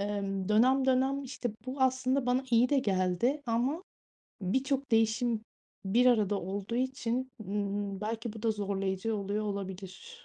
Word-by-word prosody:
Imm, 200 -2 -2
dönem 255 +5 +4
dönem, 265 +2 +2
işte, 245 -2 -4 0.2
bu 260 +2 -5
aslında 260 0 +2
bana 250 +2 +2
iyi 235 +1 +5
de 285 - +3
geldi 200 +7 +1
ama 250 +9 0 0.6
birçok 265 +7 0
değişim 225 0 +2 0.4
bir 235 +6 +3
arada 210 -5 +3
olduğu 200 +5 -4
için, 260 0 -1
ımm, 200 -1 -2
belki 225 +1 -3
bu 220 -1 -10
da 230 - +2
zorlayıcı 200 0 -1
oluyor 205 +1 -2
olabilir 200 - -6
225 Hz, 140 wpm, -31 LUFS, 200-255 Hz, 0.6 s, iyi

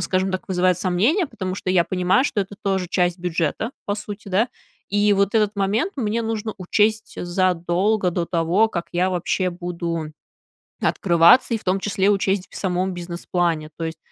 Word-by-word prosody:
скажем 190 0 0
так, 185 - -4
вызывает 185 -1 +2
сомнения, 220 - +2
потому 185 -6 -5
что 185 - -3
я 175 -2 +4
понимаю, 185 +8 +2
что 210 - 0
это 200 +1 -5
тоже 190 -3 -1
часть 180 -1 +1
бюджета, 175 - -1 0.2
по 205 - 0
сути, 205 -1 -8
да. 210 +6 +2 0.4
И 205 0 +3
вот 200 +2 +1
этот 210 -1 +2
момент 205 - 0
мне 230 -2 -1
нужно 220 -1 -3
учесть 215 +4 0
задолго 180 +2 +1
до 170 0 -1
того, 175 +6 +2
как 170 -5 -4
я 180 +2 +1
вообще 180 +1 0
буду 170 -3 -4 0.7
открываться, 175 +7 +4
и - - 0
в - - -19
том 190 +1 +1
числе 200 0 +1
учесть 195 -1 0
в - - -11
самом 185 0 -1
бизнес-плане. 170 -2 -2
То 165 - -3
есть 160 0 -5
185 Hz, 175 wpm, -22 LUFS, 175-205 Hz, 0.7 s, я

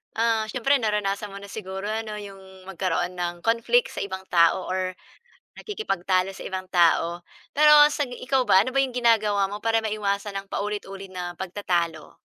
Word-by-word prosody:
Ah, 225 -1 +2
siyempre 265 +3 +2
naranasan 210 -2 -1
mo 200 - -8
na 200 - -10
siguro 190 -1 -6
ano 215 0 -3
'yong 190 -2 -12
magkaroon 180 -1 -2
ng 175 -1 -2
conflict 235 - +2
sa - - -4
ibang 190 -1 -6
tao 170 +1 +3
or 185 0 -1 0.6
nakikipagtalo 195 - -1
sa - - -9
ibang 185 -1 -5
tao. 170 0 +3 0.4
Pero 300 0 +8
sa 290 - 0
ikaw 255 +1 -1
ba, 190 - +6
ano 255 - -4
ba 275 - +4
'yong 260 -2 0
ginagawa 215 -4 +3
mo 205 - -5
para 225 0 +2
maiwasan 205 -1 -2
ang 195 - -13
paulit-ulit 195 -2 -5
na 175 -1 -5
pagtatalo? 175 -3 -2
200 Hz, 165 wpm, -25 LUFS, 185-225 Hz, 0.6 s, Pero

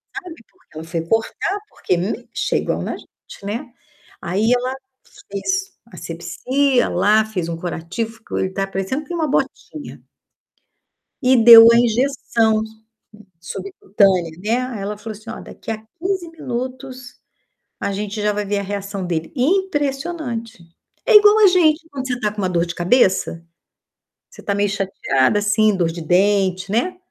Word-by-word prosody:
sabe, 365 -5 -7 0.2
porque 365 - -18
ela 160 - -6
foi 165 0 -3
cortar, 225 - -1
porque, 180 - -1
hum, 205 +7 -3
chegam - - -1
na - - -4
gente, - - -15
né. 210 +4 -3 0.6
Aí 200 +6 0
ela 250 +1 -2 0.6
fez 380 - -2 0.2
a - - -12
assepsia 245 +11 0
lá, 210 +4 +3
fez 185 -6 -4
um 165 - -4
curativo, 175 +6 -4
ficou 225 -1 -7
ele 190 - -1
tá 195 0 -2
parecendo 195 +10 -3
com 350 - -4
uma 320 -3 -1
botinha 300 +2 -3 1.2
e 255 +1 +4
deu 230 -1 +10
a 235 - +5
injeção 235 -2 +1 0.8
su 170 +3 -7
subcutânea, 190 -2 +1
né. 225 +3 +1 0.2
Aí 215 - -5
ela 205 +1 -4
falou 215 0 -8
assim: 220 +2 -13
"Ó, 225 - -6
daqui - - -8
a 220 - -3 0.2
15 370 -1 -2
minutos, 255 -3 -6 0.6
a - - -2
gente 210 +1 -4
já 210 0 +1
vai 210 0 -2
ver 205 +1 -1
a - - -4
reação 200 -1 -4
dele.", 165 -2 -3
impressionante. 280 - -1 0.4
É - - +4
igual 420 +1 +8
a 420 - +8
gente, 330 -3 +3
quando 265 -2 -5
você 245 -1 -2
tá 210 -2 0
com 210 - -9
uma 185 - 0
dor 170 -1 +1
de 170 - -6
cabeça, 180 -3 +2 0.8
você 485 - -14
tá 200 - -1
meio 205 0 +1
chateada, 195 -5 +1
assim, 215 0 +2
dor 175 -3 +1
de 170 +1 -7
dente, 185 +2 +1
né, 245 - 0
215 Hz, 160 wpm, -20 LUFS, 190-260 Hz, 1.2 s, deu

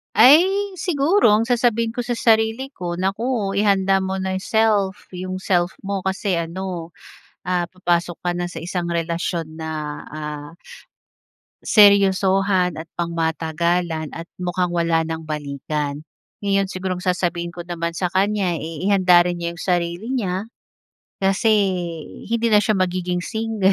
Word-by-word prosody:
Ay, 295 +7 +8 0.3
siguro 330 - +3
ang 220 +2 +3
sasabihin 230 -2 +1
ko 245 - -2
sa 245 - -4
sarili 225 +3 +2
ko, 175 -1 -4
"Naku 200 +1 -1
ihanda 195 -2 +2
mo 190 0 -2
na 190 0 -2
'yong 190 - -4
self 215 -4 +1
'yong 185 +1 -4
self 180 -2 +1 0.2
mo." 200 -2 -2
Kasi 190 0 -1
ano, 170 0 -4 0.6
ah, 180 -1 +1
papasok 175 -2 -1
ka - - +3
na 175 0 -3
sa 165 - -7
isang 175 +1 -3
relasyon 170 -1 -2
na, 160 0 -5 0.4
ah, 150 -1 -6 1.1
seryosohan 195 -3 +4
at 160 - -9
pangmatagalan 165 0 -1
at 165 - -6 0.2
mukhang 180 0 -1
wala 165 -1 +1
ng 160 0 -4
balikan. 145 0 -3 0.4
Ngayon 195 -1 +1
siguro 185 -1 -3
ang 180 - -8
sasabihin 175 -2 -1
ko 175 - -9
naman 170 -1 -3
sa 180 +2 -1
kanya, 190 -1 +1
eh, 165 +3 -4
ihanda 185 -3 +6
rin 175 0 0
niya 170 0 -3
'yong 170 - -11
sarili 175 +4 0
niya. 210 -5 -2 0.7
Kasi 195 +3 +1 0.8
hindi 235 +1 0
na 210 - +7
siya 215 0 +1
magiging 180 -1 -1
single. 220 -3 +1
185 Hz, 145 wpm, -21 LUFS, 170-200 Hz, 1.1 s, Ay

